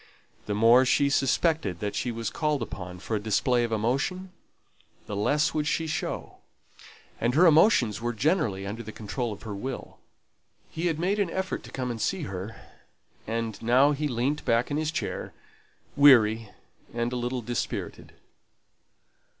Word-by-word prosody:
The 105 - -1
more 115 +4 +6
she 140 +2 +2
suspected 140 - +1
that 105 -1 -3
she 125 - -2
was 115 -1 -4
called 150 -5 0
upon 90 -4 -7
for 105 +4 -4
a - - 0
display 120 +4 +1
of 115 - -2
emotion, 135 - -1 0.7
the 105 - -5
less 145 +10 +1
would 150 -1 -1
she 165 +1 0
show; 155 - -4 0.8
and 120 +2 0
her 175 +4 +6
emotions 155 - +4
were 120 +1 -1
generally 120 - 0
under 105 +4 -5
the 110 -1 -8
control 115 +3 -4
of 105 - -9
her 110 -3 -5
will. 130 +6 -6 0.7
He 165 +2 -2
had 165 -3 0
made 190 +5 0
an 200 -4 +1
effort 190 +2 -3
to - - -11
come 125 -2 -3
and 115 -2 -5
see 190 -4 -1
her; 95 -2 -6 0.7
and 115 -1 -3
now 130 +5 +4
he 150 +1 -1
leant 130 +3 -1
back 115 +4 +1
in 145 - 0
his 155 0 -1
chair, - - -4 0.6
weary 115 -6 +5 0.5
and 120 +1 -1
a - - -2
little 125 0 -2
dispirited. 120 +1 -4
125 Hz, 165 wpm, -27 LUFS, 110-150 Hz, 0.8 s, more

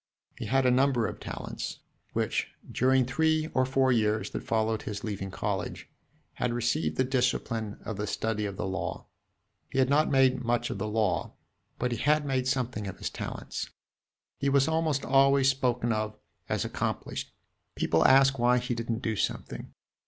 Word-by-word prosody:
He - - -4
had 135 +4 +2
a 125 - +5
number 130 -2 +3
of - - -4
talents, - - -5 0.4
which, - - 0 0.2
during 130 0 +3
three 155 +4 +1
or 130 0 +2
four 130 0 +3
years 110 -3 +1
that - - -3
followed 110 -1 0
his 105 +1 -5
leaving 100 -3 -4
college, - - -4 0.4
had 125 -1 -1
received 110 -10 0
the 130 - +4
discipline 125 -4 0
of 110 - -4
the 105 +1 -2
study 105 0 -1
of 100 -1 -7
the 105 - -2
law. 95 0 -3 0.6
He - - -5
had 130 0 +3
not 150 +2 +4
made 130 -2 +3
much 120 0 0
of - - -4
the 110 - -2
law; 105 -2 0 0.4
but 125 0 -1
he 120 - -2
had 150 +2 +3
made 130 -2 0
something 125 -5 -1
of 95 - -6
his - - -4
talents. - - -5 0.7
He 140 - +1
was 140 0 +4
almost 160 -3 +1
always 135 0 +5
spoken 125 -3 0
of 110 0 -2 0.3
as - - 0
"accomplished;" - - -3 0.4
people - - +2
asked 135 0 +6
why 125 +1 +4
he 125 0 -1
did 115 0 -5
n't 115 +2 -1
do 110 -1 0
something. - - -3
125 Hz, 175 wpm, -29 LUFS, 110-135 Hz, 0.7 s, asked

